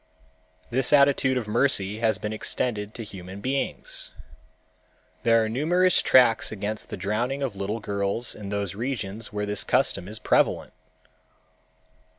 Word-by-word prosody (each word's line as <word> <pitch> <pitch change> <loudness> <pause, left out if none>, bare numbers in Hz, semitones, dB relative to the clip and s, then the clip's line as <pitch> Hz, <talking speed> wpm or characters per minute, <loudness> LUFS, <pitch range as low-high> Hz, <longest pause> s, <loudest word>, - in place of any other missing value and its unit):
This 125 +1 +3
attitude 140 -2 +4
of 120 -4 -3
mercy 105 -3 +2
has 110 -1 +2
been 105 0 -4
extended 110 -1 -2
to 115 - -5
human 95 -2 -9
beings. 135 +5 -3 1.1
There 115 +4 +4
are - - -1
numerous 175 +10 +3
tracts 125 -3 +4
against 105 +1 -4
the - - -5
drowning 120 +8 -2
of 125 -7 -3
little 100 +3 -3
girls 100 +3 -2
in 100 -2 -8
those 100 -2 -2
regions 110 -2 -4
where 105 -1 -2
this 105 0 -1
custom 90 - +1
is 110 +2 -4
prevalent. - - +1
110 Hz, 140 wpm, -25 LUFS, 100-125 Hz, 1.1 s, attitude